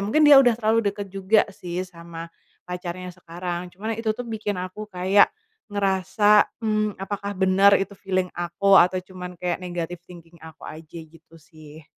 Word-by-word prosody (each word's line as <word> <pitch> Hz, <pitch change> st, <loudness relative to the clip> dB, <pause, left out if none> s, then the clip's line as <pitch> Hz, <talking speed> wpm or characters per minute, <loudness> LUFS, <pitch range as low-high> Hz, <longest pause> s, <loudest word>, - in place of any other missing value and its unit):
mungkin 305 Hz, +9 st, +3 dB
dia 295 Hz, -1 st, +9 dB
udah 245 Hz, -4 st, +3 dB
terlalu 225 Hz, -1 st, +1 dB
dekat 200 Hz, 0 st, -5 dB
juga 195 Hz, +2 st, +3 dB
sih, 180 Hz, 0 st, -5 dB
sama, 170 Hz, -2 st, -10 dB, 0.4 s
pacarnya 180 Hz, 0 st, -6 dB
sekarang. 175 Hz, 0 st, -6 dB
Cuma 220 Hz, +5 st, -4 dB
itu 225 Hz, 0 st, -2 dB
tuh 245 Hz, -, -5 dB
bikin 215 Hz, -4 st, -4 dB
aku 185 Hz, +4 st, -6 dB
kayak 190 Hz, +1 st, +4 dB, 0.4 s
ngerasa, 205 Hz, +1 st, +3 dB, 0.2 s
mmm, 215 Hz, -1 st, 0 dB
apakah 200 Hz, +1 st, -5 dB
benar 190 Hz, +1 st, +5 dB
itu 195 Hz, +1 st, -3 dB
feeling 185 Hz, -2 st, -1 dB
aku, 175 Hz, +3 st, 0 dB
atau 180 Hz, +2 st, +3 dB
cuman 180 Hz, -1 st, -9 dB
kayak 175 Hz, 0 st, -3 dB
negatif 175 Hz, -1 st, -5 dB
thinking 170 Hz, -1 st, -14 dB
aku 160 Hz, -1 st, -13 dB
aja 160 Hz, +1 st, -11 dB
gitu 165 Hz, +1 st, -17 dB
sih. 155 Hz, -1 st, -15 dB
185 Hz, 160 wpm, -24 LUFS, 175-205 Hz, 0.4 s, dia